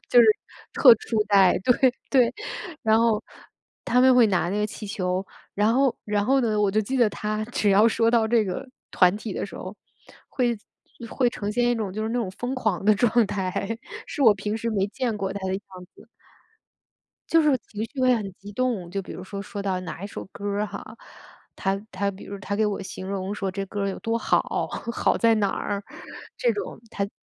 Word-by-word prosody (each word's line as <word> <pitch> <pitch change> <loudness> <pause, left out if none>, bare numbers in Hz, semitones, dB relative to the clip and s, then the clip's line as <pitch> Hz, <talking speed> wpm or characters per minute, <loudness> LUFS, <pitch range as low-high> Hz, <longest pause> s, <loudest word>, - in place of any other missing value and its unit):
就 245 - +7
是 230 - +6 0.5
特 250 -6 +8
初 220 -1 -1
代。 195 -3 +5
对， 250 0 +4 0.2
对。 250 -4 +4 0.5
然 220 0 +4
后 225 -2 +2 0.6
她 250 - +3
们 260 0 +6
会 240 -3 +6
拿 175 -2 +1
那 200 - -1
个 210 - +1
气 215 - -8
球， 185 -1 -2 0.3
然 210 +2 +3
后 270 -1 +3
然 205 -1 0
后 270 +3 +3
呢， 220 -3 0
我 200 -1 +3
就 215 - +2
记 260 +6 -2
得 240 -3 +4
她 215 0 -3
只 215 -4 +1
要 205 +3 +6
说 230 0 +3
到 230 -2 +3
这 225 -1 +3
个 190 +6 -4 0.2
团 180 0 +4
体 215 -2 -6
的 - - -2
时 200 - -9
候， 185 +3 -8 0.5
会 240 -3 0 0.5
会 250 -3 +2
呈 210 -3 -4
现 240 +1 +2
一 - - +2
种 210 -5 -3
就 215 +2 -3
是 220 - -1
那 245 +2 -1
种 215 -6 -2
疯 250 +2 -2
狂 215 -8 -1
的 215 - +6
状 230 +1 +3
态， 195 +3 -3 0.3
是 290 - -3
我 220 -5 +7
平 210 +2 -3
时 230 0 -2
没 200 -2 +1
见 240 +1 -2
过 195 -2 -2
她 200 - -4
的 190 - -1
样 195 - -3 0.3
子。 - - -17 1.2
就 330 0 +5
是 295 -3 +4
情 215 +1 -4
绪 265 +1 -6
会 255 -1 +5
很 200 -4 -4
激 200 +2 -12
动， 230 -7 -1
就 195 +2 -3
比 - - -9
如 185 - -7
说， 200 +1 -7
说 200 0 -6
到 190 -2 -1
哪 165 0 -7
一 200 - -3
首 - - -7
歌 200 - -11
儿 205 +1 0
哈。 - - -9 0.6
她 195 0 0 0.2
她 200 +2 -1
比 195 0 -9
如 200 - -7
她 200 0 -3
给 215 +1 +2
我 205 -1 -2
形 190 0 -7
容 195 +1 -3
说 195 -2 -2
这 195 +1 -3
歌 205 +1 -4
儿 200 - 0
有 195 - -5
多 225 0 -1
好， - - +2 0.5
好 - - +1
在 230 -1 +4
哪 200 -2 +1
儿， 200 +1 -3 0.6
这 - - -1 0.4
种。 - - -15
她 200 0 -1
210 Hz, 235 characters per minute, -25 LUFS, 195-235 Hz, 1.2 s, 特